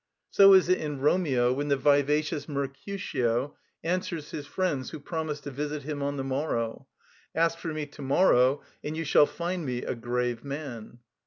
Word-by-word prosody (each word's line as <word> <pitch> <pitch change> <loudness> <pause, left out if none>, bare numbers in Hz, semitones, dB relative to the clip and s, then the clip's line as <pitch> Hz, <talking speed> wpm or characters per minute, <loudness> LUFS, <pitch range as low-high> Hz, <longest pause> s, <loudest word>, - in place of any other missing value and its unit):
So 195 -1 +8
is 185 - +5
it 185 - +3
in 150 -3 -4
"Romeo" 135 -5 +2
when 145 +2 -2
the 140 -1 +2
vivacious 145 +2 +2
Mercutio 140 - -2 0.3
answers 170 -3 -2
his 145 -1 -6
friends 145 -6 -1
who 155 - -7
promise 155 0 -4
to 145 - -7
visit 145 +2 -4
him 145 0 -4
on 140 0 -2
the 135 - -2
morrow: 135 -2 -2 0.5
"Ask 165 +1 +2
for 165 - -4
me 155 -1 -3
to 145 0 -13
morrow, 135 -2 +3 0.2
and 155 +1 -4
you 165 - -1
shall 145 -1 +5
find 175 0 -3
me 125 -3 -3
a - - -2
grave 120 0 -2
man." 135 -5 -7
145 Hz, 175 wpm, -28 LUFS, 135-160 Hz, 0.5 s, So